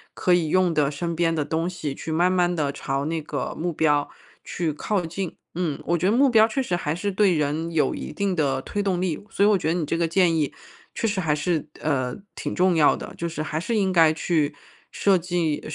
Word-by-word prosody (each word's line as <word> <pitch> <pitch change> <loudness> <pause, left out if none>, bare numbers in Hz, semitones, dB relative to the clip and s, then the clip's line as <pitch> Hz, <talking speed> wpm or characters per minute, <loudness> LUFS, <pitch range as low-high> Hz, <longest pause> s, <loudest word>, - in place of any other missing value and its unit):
可 180 - +2
以 170 -3 +2
用 185 -1 +3
的 150 -2 +2
身 170 +3 -3
边 165 0 +1
的 150 -3 -1
东 165 +3 -1
西 165 -6 -4
去 160 - -6
慢 175 +3 +3
慢 180 -1 +2
的 150 -5 0
朝 135 0 -2
那 160 +1 -2
个 150 - -4
目 175 +2 -1
标 150 -2 +2 0.3
去 165 -4 -2
靠 190 +4 -1
近。 175 +2 -5 0.2
嗯 165 -4 -2
我 170 +1 +1
觉 170 - -2
得 - - +3
目 275 +2 +5
标 220 -2 +6
确 265 +4 -1
实 180 -8 -1
还 155 -2 -2
是 200 +3 -2
对 190 -1 +3
人 155 +2 -1
有 150 -4 +2
一 - - -6
定 200 -2 -1
的 135 -4 0
推 205 - -3
动 185 -3 0
力， 180 -1 -1
所 200 - +2
以 - - +6
我 205 - +4
觉 160 - -3
得 - - +2
你 170 -3 -1
这 165 - -1
个 170 -1 +1
建 170 0 +3
议 150 -3 0 0.4
确 - - -2
实 200 -2 -1
还 155 -3 +1
是， 160 0 -1 0.2
呃 130 -5 0 0.2
挺 - - -4
重 185 0 +3
要 155 -2 +5
的， - - -8
就 170 - -2
是 160 -2 -5
还 155 0 -4
是 230 +7 -2
应 195 -3 +2
该 165 -3 +5
去 155 -2 0 0.4
设 195 -2 +3
计 170 -3 -1
170 Hz, 260 characters per minute, -24 LUFS, 155-185 Hz, 0.4 s, 标